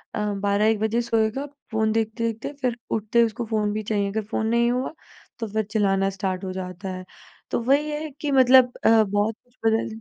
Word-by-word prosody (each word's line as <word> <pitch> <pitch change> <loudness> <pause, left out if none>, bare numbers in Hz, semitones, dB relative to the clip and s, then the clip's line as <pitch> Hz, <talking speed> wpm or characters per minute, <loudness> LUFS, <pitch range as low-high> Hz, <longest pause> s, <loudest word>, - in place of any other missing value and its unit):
अ, - - -2
12-1 205 +2 +1
बजे 220 +2 +1
सोएगा, 230 +3 0 0.3
फ़ोन 220 0 +1
देखते-देखते 225 +3 -2
फिर 245 -2 0
उठते 220 +2 +1
ही 235 - +7
उसको 230 +1 -4
फ़ोन 215 -2 0
भी 215 0 -3
चाहिए, 205 -1 0
अगर 220 +1 -2
फ़ोन 220 - 0
नहीं 235 +1 +2
हुआ, 255 +5 -2 0.5
तो 225 - -3
फिर 215 +1 -1
चिल्लाना 195 -2 +2
स्टार्ट 190 -1 -3
हो 185 - -3
जाता 185 +1 -6
है। 185 0 -6 0.5
तो - - +1
वही 280 +5 +2
है 300 +1 -4
कि 295 -2 -1
मतलब 260 -1 +6
अ, - - +5
बहुत 205 +2 0
कुछ 245 0 -34
बदल 225 0 +2
220 Hz, 200 wpm, -24 LUFS, 205-235 Hz, 0.5 s, ही